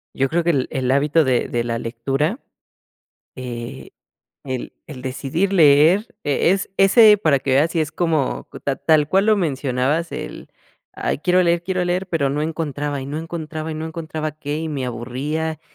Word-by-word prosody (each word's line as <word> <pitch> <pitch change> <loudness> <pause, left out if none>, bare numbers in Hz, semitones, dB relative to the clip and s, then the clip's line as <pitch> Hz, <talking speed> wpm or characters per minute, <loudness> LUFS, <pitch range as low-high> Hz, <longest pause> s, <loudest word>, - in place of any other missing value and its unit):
Yo 135 0 +1
creo 170 +1 +1
que 170 - +3
el 135 -5 0
el 130 -1 -1
hábito 145 +4 +3
de 130 -3 +1
de 120 -1 -1
la 115 -1 -2
lectura, 135 - -2 1.0
eh, 125 0 -7 0.5
el 130 -2 -5
el 140 -5 -9
decidir 140 +9 -2
leer 165 +5 +5
e 145 +4 +2
es 195 +1 -1
ese 210 +2 +7
para 155 -8 +2
que 135 - -2
veas 145 +5 +3
si 170 - -1
es 155 -1 -2
como 160 -6 -1
ta 140 - -1
tal 150 +1 +2
cual 195 +6 +2
lo 215 -1 +4
mencionabas, 145 -1 -1
el: - - -7 0.4
"Ay - - -3
quiero 180 +3 +3
leer, 170 0 +1
quiero 185 0 -1
leer", 180 +2 -1
pero 150 -5 +1
no 145 +2 -1
encontraba 150 -2 -3
y 135 - -6
no 145 +2 -4
encontraba 160 -1 -5
y - - -4
no 155 +1 -4
encontraba 155 -1 -5
qué, 150 0 -4
y 160 +1 -3
me 140 -4 -3
aburría, 140 +7 -3
155 Hz, 185 wpm, -21 LUFS, 135-170 Hz, 1.0 s, ese